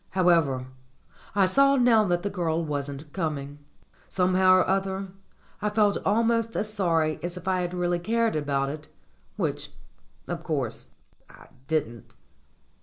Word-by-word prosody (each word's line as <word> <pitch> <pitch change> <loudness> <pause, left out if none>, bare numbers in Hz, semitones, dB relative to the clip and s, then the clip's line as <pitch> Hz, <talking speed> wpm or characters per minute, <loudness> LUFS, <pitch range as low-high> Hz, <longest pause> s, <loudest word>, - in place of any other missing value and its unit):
However, 165 -8 +3 0.7
I 200 -2 +5
saw 275 +9 +4
now 240 -4 +5
that 175 -2 0
the 205 - -1
girl 170 -3 -1
wasn't 145 0 -5
coming. 145 -5 -3 0.5
Somehow 185 0 +4
or 185 - +3
other 195 0 -1 0.5
I 210 - +1
felt 210 -1 +2
al 210 +4 +2
most 230 0 0
as 215 0 -2
sorry 165 -6 +1
as 175 +1 -5
if 180 +1 -9
I 185 -1 +1
had 175 0 -3
really 175 -1 0
cared 225 +4 0
about 140 -2 0
it, 150 +1 -7 0.5
which, - - -2 0.6
of - - -4
course, - - -3 0.4
I - - -16 0.2
didn't. 130 -8 -3
180 Hz, 145 wpm, -26 LUFS, 155-205 Hz, 0.7 s, I